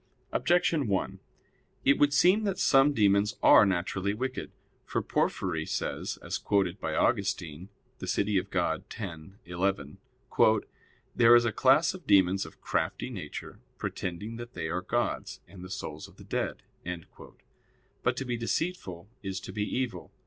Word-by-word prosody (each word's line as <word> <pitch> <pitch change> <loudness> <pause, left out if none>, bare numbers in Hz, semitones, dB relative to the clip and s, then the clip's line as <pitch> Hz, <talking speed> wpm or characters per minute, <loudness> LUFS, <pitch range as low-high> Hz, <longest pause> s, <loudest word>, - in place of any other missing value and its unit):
Objection 170 -6 +2
1: 95 -2 -1 0.7
It 140 +1 +4
would 145 0 +5
seem 180 +9 +4
that 200 -3 -1
some 135 +1 +5
demons 105 -4 +3
are 105 - +8
naturally 95 +2 -1
wicked. 130 +3 -4 0.3
For - - -2
Porphyry 80 -4 -1
says, - - -3
as - - -3
quoted 100 -2 0
by - - -3
Augustine 95 -6 0 0.3
(De - - -6
Civ. - - +1
Dei 105 -2 +2
x, 90 -2 -4
11): 90 -5 -2 1.2
"There 120 0 +7
is 120 0 +5
a 120 - +1
class 135 - +4
of 185 -2 -11
demons 95 -2 +4
of 80 - -16
crafty 130 - -2
nature, 90 -11 -7 0.2
pretending 100 +6 -4
that 120 +1 -9
they 80 - -3
are 90 +2 -1
gods 120 +6 -2
and 90 0 -12
the 90 - -9
souls 95 - -6
of - - -19
the - - -12
dead." - - -3 1.4
But - - 0
to 135 - -3
be 120 -1 -2
deceitful 115 - -3
is 95 -1 -4
to - - -8
be 105 - -3
evil. 130 +2 -3
100 Hz, 150 wpm, -29 LUFS, 90-130 Hz, 1.4 s, are